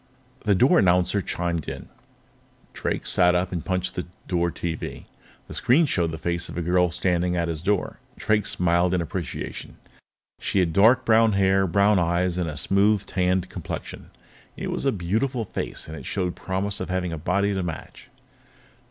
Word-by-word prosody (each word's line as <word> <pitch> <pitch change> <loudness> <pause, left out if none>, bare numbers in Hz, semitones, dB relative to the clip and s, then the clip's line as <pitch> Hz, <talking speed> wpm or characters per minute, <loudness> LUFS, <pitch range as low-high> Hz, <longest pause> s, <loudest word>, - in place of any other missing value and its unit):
The 105 -2 +4
door 130 - +5
announcer 90 +1 +3
chimed. 85 -3 -3 0.9
Drake - - -3
sat 90 0 +4
up 90 +1 0
and 85 -3 -3
punched 90 -1 -1
the 90 - -4 0.2
door 85 -1 +1
TV. 85 -1 -5 0.4
The - - -9
screen 135 +8 +3
showed 85 - 0
the 80 - -5
face 85 +2 -2
of - - -7
a 85 - -1
girl 90 +1 +3
standing 90 +1 0
at 85 -1 0
his 80 -2 -3
door. 100 +1 -1 0.2
Drake 105 -1 +1
smiled 90 +1 +2
in 90 - +1
appreciation. 85 -2 -5 0.6
She - - -2
had 90 -4 +2
dark 110 +7 +5
brown 110 -1 +4
hair, 95 0 +3
brown 100 +3 +3
eyes, 85 +1 +1
and 85 -2 -1
a 75 - -6
smooth, 100 +7 +2
tanned 90 -1 0
complexion. - - -7 0.5
It - - -4
was - - -2
a - - +4
beautiful 110 +6 -1
face, - - -5
and 80 - -7
it 70 - -9
showed 90 -3 -2
promise 100 +2 -3
of 95 - -4
having 90 -2 -1
a - - -3
body 100 +5 +1
to 95 - -1
match. 85 -3 -7
90 Hz, 175 wpm, -24 LUFS, 85-100 Hz, 0.9 s, door